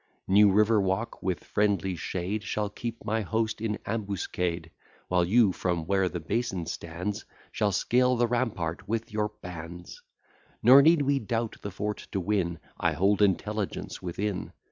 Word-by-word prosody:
New 100 Hz, +1 st, +6 dB
River 105 Hz, +2 st, +4 dB
Walk, 95 Hz, +4 st, -2 dB
with 90 Hz, -3 st, -2 dB
friendly 100 Hz, -3 st, 0 dB
shade, 95 Hz, +5 st, -3 dB
Shall 105 Hz, 0 st, -2 dB
keep 115 Hz, 0 st, -6 dB
my 110 Hz, 0 st, 0 dB
host 110 Hz, +2 st, -1 dB
in 110 Hz, -2 st, -1 dB
ambuscade; 90 Hz, -6 st, -2 dB, 0.4 s
While 90 Hz, -1 st, +3 dB
you, 105 Hz, +3 st, +4 dB
from 85 Hz, -3 st, -2 dB
where 95 Hz, 0 st, +2 dB
the 90 Hz, -, -4 dB
basin 95 Hz, +1 st, -2 dB
stands, 85 Hz, +6 st, -4 dB, 0.3 s
Shall 105 Hz, -1 st, +1 dB
scale 125 Hz, +6 st, +2 dB
the 120 Hz, 0 st, +3 dB
rampart 105 Hz, -8 st, -2 dB
with 115 Hz, 0 st, -2 dB
your 105 Hz, 0 st, 0 dB
bands. 85 Hz, 0 st, -8 dB, 0.6 s
Nor 130 Hz, +5 st, +9 dB
need 160 Hz, 0 st, +5 dB
we 140 Hz, 0 st, +2 dB
doubt 115 Hz, 0 st, -2 dB
the 100 Hz, -, -4 dB
fort 105 Hz, +2 st, -4 dB
to 100 Hz, -, 0 dB
win; 90 Hz, -3 st, 0 dB, 0.2 s
I 85 Hz, -1 st, +2 dB
hold 100 Hz, +6 st, +2 dB
intelligence 105 Hz, +1 st, 0 dB
within. 95 Hz, +1 st, -3 dB
100 Hz, 155 wpm, -28 LUFS, 90-110 Hz, 0.6 s, Nor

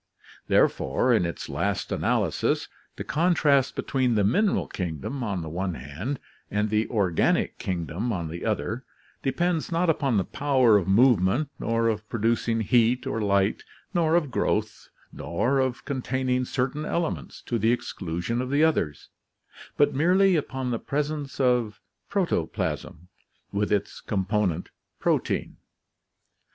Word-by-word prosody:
Therefore, -, -, +2 dB
in 90 Hz, -, +3 dB
its 85 Hz, -, -6 dB
last -, -, -2 dB
analysis, -, -, 0 dB, 0.3 s
the -, -, -5 dB
contrast 150 Hz, -5 st, +2 dB
between 130 Hz, -3 st, 0 dB
the 105 Hz, -, +3 dB
mineral 190 Hz, -, +2 dB
kingdom 90 Hz, -, -4 dB
on 100 Hz, -6 st, -2 dB
the -, -, -6 dB
one 90 Hz, +2 st, -2 dB
hand, 80 Hz, -, -5 dB, 0.3 s
and 105 Hz, 0 st, 0 dB
the 110 Hz, +1 st, +1 dB
organic 95 Hz, -7 st, +1 dB
kingdom 90 Hz, -, -2 dB
on 85 Hz, -6 st, -2 dB
the 85 Hz, +2 st, -6 dB
other 110 Hz, +3 st, -2 dB, 0.4 s
depends 165 Hz, +5 st, 0 dB
not 170 Hz, 0 st, +3 dB
upon 135 Hz, -7 st, 0 dB
the 95 Hz, -, +2 dB
power 130 Hz, -4 st, +3 dB
of 100 Hz, -3 st, +2 dB
movement 115 Hz, -, +4 dB
nor 115 Hz, 0 st, +1 dB
of 105 Hz, -2 st, -2 dB
producing 115 Hz, 0 st, 0 dB
heat 120 Hz, +3 st, +3 dB
or 115 Hz, -, -2 dB
light, 100 Hz, 0 st, +2 dB, 0.3 s
nor 165 Hz, -2 st, +2 dB
of 155 Hz, -6 st, +1 dB
growth, -, -, -1 dB, 0.2 s
nor 120 Hz, -, 0 dB
of 130 Hz, 0 st, -1 dB
containing 130 Hz, -2 st, -1 dB
certain 135 Hz, +4 st, -2 dB
elements 170 Hz, 0 st, -3 dB
to 120 Hz, -, -2 dB
the 110 Hz, +3 st, +3 dB
exclusion 95 Hz, 0 st, -2 dB
of 130 Hz, -, -4 dB
the 145 Hz, +3 st, +3 dB
others, 85 Hz, -, 0 dB, 0.7 s
but 145 Hz, -, +4 dB
merely 185 Hz, +6 st, +4 dB
upon 130 Hz, -4 st, -2 dB
the 115 Hz, -, -1 dB
presence 145 Hz, -1 st, -3 dB
of 125 Hz, -5 st, +1 dB, 0.3 s
protoplasm 90 Hz, -, -2 dB, 0.4 s
with 105 Hz, +1 st, -1 dB
its 105 Hz, -1 st, -1 dB
component 95 Hz, -3 st, -1 dB, 0.3 s
protein. -, -, 0 dB
120 Hz, 135 wpm, -26 LUFS, 100-140 Hz, 0.7 s, movement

